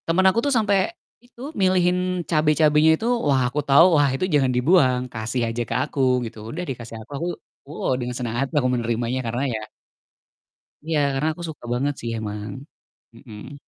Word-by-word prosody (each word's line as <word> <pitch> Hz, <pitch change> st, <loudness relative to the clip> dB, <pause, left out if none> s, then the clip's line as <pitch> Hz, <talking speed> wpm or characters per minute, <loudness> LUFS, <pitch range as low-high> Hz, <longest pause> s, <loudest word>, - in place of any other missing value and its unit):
Temen 175 Hz, +3 st, +2 dB
aku 220 Hz, -, +1 dB
tuh -, -, +1 dB
sampe 210 Hz, -2 st, +2 dB, 0.5 s
itu, 245 Hz, 0 st, -18 dB
milihin 180 Hz, -, +1 dB
cabe-cabenya 155 Hz, -1 st, +3 dB
itu, 225 Hz, -, -3 dB, 0.2 s
wah, 135 Hz, -2 st, +3 dB
aku 140 Hz, +4 st, -3 dB
tau, 140 Hz, +5 st, +8 dB
wah 145 Hz, -2 st, +4 dB
itu 160 Hz, -, -1 dB
jangan 135 Hz, -3 st, +3 dB
dibuang, 130 Hz, -2 st, +3 dB
kasih 110 Hz, +2 st, -3 dB
aja 115 Hz, +1 st, -3 dB
ke 115 Hz, -, -2 dB
aku 145 Hz, -1 st, -6 dB, 0.3 s
gitu, 115 Hz, 0 st, -9 dB
udah 170 Hz, +8 st, -5 dB
dikasih 115 Hz, -3 st, -7 dB
aku, 110 Hz, -, -15 dB
aku, 170 Hz, +4 st, -3 dB, 0.4 s
woh, 145 Hz, -, -2 dB
dengan 125 Hz, 0 st, -4 dB
semangat 120 Hz, +2 st, -2 dB
aku 130 Hz, -3 st, +2 dB
menerimanya, 120 Hz, +1 st, -1 dB
karena 120 Hz, +2 st, -2 dB
ya 110 Hz, -, -3 dB, 1.2 s
ya 150 Hz, -3 st, 0 dB
karena 135 Hz, +3 st, -1 dB
aku 175 Hz, -, -11 dB
suka 150 Hz, -6 st, -10 dB
banget 140 Hz, +4 st, 0 dB
sih 115 Hz, -, -4 dB
emang, 105 Hz, +5 st, -6 dB, 0.5 s
mhm. 115 Hz, +1 st, -11 dB
140 Hz, 170 wpm, -23 LUFS, 120-165 Hz, 1.2 s, tau